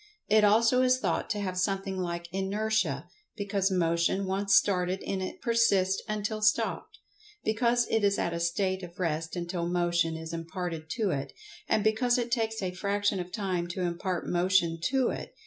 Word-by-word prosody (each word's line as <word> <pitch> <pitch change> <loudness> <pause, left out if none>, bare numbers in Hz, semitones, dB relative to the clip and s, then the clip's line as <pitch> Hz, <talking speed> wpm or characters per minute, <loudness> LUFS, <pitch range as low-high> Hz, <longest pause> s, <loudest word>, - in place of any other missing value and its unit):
It 215 0 +5
also 225 +4 +5
is 255 0 +4
thought - - -1
to 210 - -1
have 185 -2 -2
something 195 +1 -1
like 170 -2 -3
Inertia, 195 -6 -1 0.3
because 200 -2 0
Motion 170 +1 +1
once 195 +1 +2
started 185 -1 +2
in 190 -1 -2
it 185 - -6
persists 200 -5 +2
until 215 0 -2
stopped; 215 +1 +1 0.5
because 235 +2 +2
it 225 -1 +1
is 200 0 +3
at 170 - -1
a 170 - -2
state 185 +3 0
of 175 -1 -10
rest 165 -1 -2
until 175 0 -3
Motion 175 -2 +1
is 160 0 -7
imparted 165 -1 -5
to 215 -5 0
it; 135 -1 -3 0.4
and 215 - +2
because 240 +3 +2
it 240 -1 -2
takes 225 -3 -1
a 185 - -1
fraction 200 +1 0
of 180 0 -5
time 185 -5 -2
to 175 +2 -4
impart[Pg 175 +1 -2
102] - - -5
motion 175 -2 +2
to 265 -1 +2
it. - - -6
190 Hz, 180 wpm, -29 LUFS, 175-215 Hz, 0.5 s, It